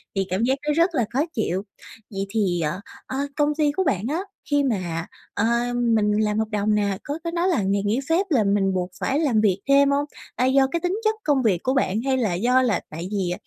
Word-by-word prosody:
Thì 195 0 +1
cảm 190 +5 0
giác 265 +2 +2
nó 300 - +3
rất 335 +2 +2
là 245 -5 +2
khó 260 - +1
chịu. 190 -4 -1 0.5
Vậy 195 -1 -3
thì, 195 -5 0
ờ, 150 +3 -2 0.3
ơ, 260 - -5 0.2
công 295 0 +1
ty 300 -2 +3
của 380 +6 0
bạn 225 - 0
á 315 +4 -1 0.3
khi 290 -1 +3
mà, 180 -10 -2 0.3
ơ, 205 - 0 0.3
mình 225 -3 +2
làm 210 0 +1
hợp 220 - 0
đồng 210 0 +1
nè, 200 -2 0
có 290 +3 -4
có 335 - -2
nói 345 +1 0
là 350 - +2
ngày 195 +1 0
nghỉ 210 +5 +1
phép 345 +5 +3
là 255 -9 +3
mình 200 -1 +1
buộc 180 -1 -1
phải 275 +2 0
làm 260 -9 +2
việc 195 -3 +2
thêm 280 0 +6
hông? 285 +1 +1 0.3
A, 250 - +1
do 265 +1 +4
cái 340 - 0
tính 360 +5 -1
chất 435 0 +2
công 280 -4 +2
việc 185 -6 +1
của 260 - +1
bạn 225 -5 +1
hay 265 +1 0
là 220 -8 0
do 245 +8 +3
là 235 -7 +1
tại 165 +3 -6
vì 190 -4 -1
230 Hz, 245 wpm, -23 LUFS, 195-285 Hz, 0.5 s, thêm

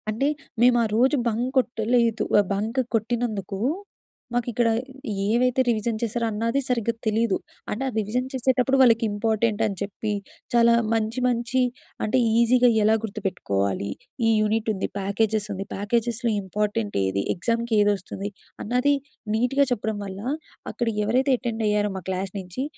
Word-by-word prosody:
అంటే, 225 +6 0 0.3
మేము 245 0 +6
ఆ - - +2
రోజు 260 +6 +4
బంక్ 235 +3 0
కొట్టలేదు. 235 -2 +2 0.2
ఆహ్, 200 - +2
బంక్ 220 +6 0
కొట్టినందుకు 220 -3 -1 0.8
మాకు 245 0 0
ఇక్కడ 235 +1 +2 0.6
ఏవైతే 250 +3 +3
రివిజన్ 225 -1 0
చేశారో 235 0 -1
అన్నాది 230 +5 0
సరిగ్గా 235 -2 0
తెలీదు. 220 -1 +2 0.3
అంటే 230 +6 -2
ఆ - - 0
రివిజన్ 225 +4 -1
చేసేటప్పుడు 260 +1 +2
వాళ్ళకి 230 -3 +5
ఇంపార్టెంట్ 220 +1 0
అని 205 -2 -1
చెప్పి, 205 +2 -3 0.4
చాలా 235 0 +5 0.2
మంచి 225 +2 0
మంచి 245 +1 +1 0.4
అంటే 215 +4 +1 0.2
ఈజీగా 245 +1 +5
ఎలా 215 +1 +5
గుర్తుపెట్టుకోవాలి, 100 - -2 0.4
ఈ - - +4
యూనిట్ 220 +1 0
ఉంది. 195 - -2
ప్యాకేజెస్ 210 +2 0
ఉంది. 195 +1 -5
ప్యాకేజెస్‌లో 235 +3 0
ఇంపార్టెంట్ 210 +2 -2
ఏది, 95 +1 0
ఎగ్జాముకి 230 +5 -1
ఏది 205 0 +4
వస్తుంది, 195 +1 -6 0.3
అన్నది 250 +6 +2 0.4
నీట్‌గా 250 +5 +2
చెప్పడం 220 -2 -1
వల్ల, 195 0 -7 0.5
అక్కడ 240 - -2 0.2
ఎవరైతే 260 +5 +2
అటెండ్ 230 -3 -3
అయ్యారో 210 0 +2
మా 185 - -7
క్లాస్ 190 0 -2
నుంచి, 185 +7 -5
225 Hz, 140 wpm, -24 LUFS, 205-240 Hz, 0.8 s, మేము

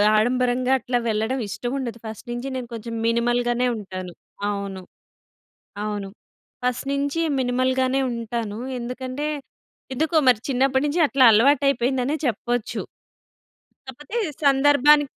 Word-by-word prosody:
ఆడంబరంగా 250 +3 +2
అట్లా 245 -1 -1
వెళ్ళడం 220 +5 0
ఇష్టముండదు. 240 +2 -4
ఫస్ట్ 220 +3 -8
నుంచి 240 +3 -4
నేను 250 - -5
కొంచెం 230 0 -6
మినిమల్ 235 +1 +2
గానే 245 +1 +1
ఉంటాను. 185 -3 -7 0.4
అవును. 200 -2 -4 1.0
అవును. 205 -2 -3 0.6
ఫస్ట్ 250 +2 -1
నుంచి 280 +3 -1 0.2
మినిమల్‌ 255 +1 +1
గానే 260 +1 +1
ఉంటాను. 230 -2 -4 0.2
ఎందుకంటే 255 +4 -4 0.7
ఎందుకో 315 +5 0
మరి 240 -4 +5
చిన్నప్పడినుంచి 275 +4 +1
అట్లా 270 -2 +3
అలవాటైపోయిందనే 265 +2 +3
చెప్పొచ్చు. 240 0 -1 1.1
కాకపోతే 295 - -9 0.3
సందర్భాని 290 +1 +5
250 Hz, 105 wpm, -23 LUFS, 230-270 Hz, 1.1 s, మరి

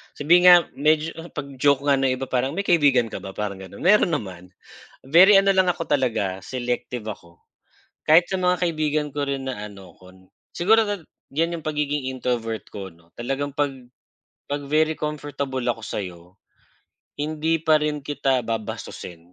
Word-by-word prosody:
Sabihin 175 +5 +4
nga 180 - +11 0.2
medyo 155 +2 +2 0.2
pag-joke 140 -1 0
nga 140 -2 +3
ng 130 -1 +1
iba 130 +1 -5
parang 130 +4 0
may 200 - -1
kaibigan 140 - +3
ka - - -5
ba 95 - -8
parang 100 -2 -4
gano'n, 95 +1 -10
meron 190 -1 +4
naman. 90 -2 -7 0.6
Very 185 +7 +7
ano 195 0 +3
lang 185 -1 +3
ako 175 -1 -3
talaga 110 -9 -1
selective 125 -2 -4
ako 85 -5 -9 0.7
kahit 165 +3 +6
sa 190 - -1
mga 180 0 +1
kaibigan 155 -3 0
ko 145 -1 -1
rin 135 -1 -3
na 130 - -4
ano 95 -4 -13
ko, 90 0 -16 0.4
siguro 220 +5 +3 0.5
diyan 165 +3 0
yung - - -17
pagiging 150 -2 -1
introvert 115 -4 -2
ko 95 -2 -8
ano 85 0 -25
talagang 135 +4 -2
'pag 145 -2 +1 0.8
'pag 145 0 -2
very 155 +1 +2
comfortable 145 -3 -4
ako 115 -1 -5
sa'yo 90 -5 -5 1.0
hindi 155 +2 -1
pa 160 -1 +4
rin 150 -1 -1
kita 135 -2 0
babastusin. 90 -6 -6
140 Hz, 160 wpm, -23 LUFS, 115-155 Hz, 1.0 s, nga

